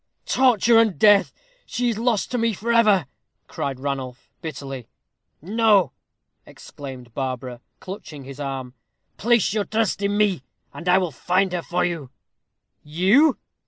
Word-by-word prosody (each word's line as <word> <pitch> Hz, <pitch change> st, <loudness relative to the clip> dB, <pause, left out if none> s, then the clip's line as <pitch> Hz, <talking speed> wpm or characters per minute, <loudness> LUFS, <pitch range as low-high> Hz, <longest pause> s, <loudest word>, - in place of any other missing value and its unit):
"Torture 235 Hz, -3 st, +4 dB
and 220 Hz, -5 st, +2 dB
death! 205 Hz, -2 st, +5 dB, 0.4 s
She 245 Hz, -1 st, -1 dB
is 220 Hz, -2 st, -2 dB
lost 230 Hz, -3 st, 0 dB
to 250 Hz, -, -1 dB
me 230 Hz, -1 st, +1 dB
for 230 Hz, +4 st, -2 dB
ever!" 210 Hz, -8 st, +4 dB, 0.4 s
cried 135 Hz, -2 st, -4 dB
Ranulph, 130 Hz, -2 st, -5 dB
bitterly. 135 Hz, -, -7 dB, 0.6 s
"No!" 205 Hz, -, +3 dB, 0.5 s
exclaimed 130 Hz, -4 st, -11 dB
Barbara, 130 Hz, -2 st, -4 dB, 0.2 s
clutching 170 Hz, -7 st, -9 dB
his 135 Hz, +1 st, -10 dB
arm. 135 Hz, -3 st, -5 dB, 0.4 s
"Place 235 Hz, -3 st, +2 dB
your 210 Hz, -2 st, 0 dB
trust 220 Hz, -2 st, -1 dB
in 200 Hz, +1 st, 0 dB
me, 205 Hz, -8 st, +2 dB, 0.3 s
and 175 Hz, +2 st, -5 dB
I 180 Hz, -, +6 dB
will 180 Hz, -3 st, 0 dB
find 180 Hz, +8 st, 0 dB
her 175 Hz, -, -1 dB
for 175 Hz, +1 st, -1 dB
you." 165 Hz, -7 st, -4 dB, 0.7 s
"You!" 195 Hz, -, +3 dB
185 Hz, 140 wpm, -23 LUFS, 140-220 Hz, 0.7 s, I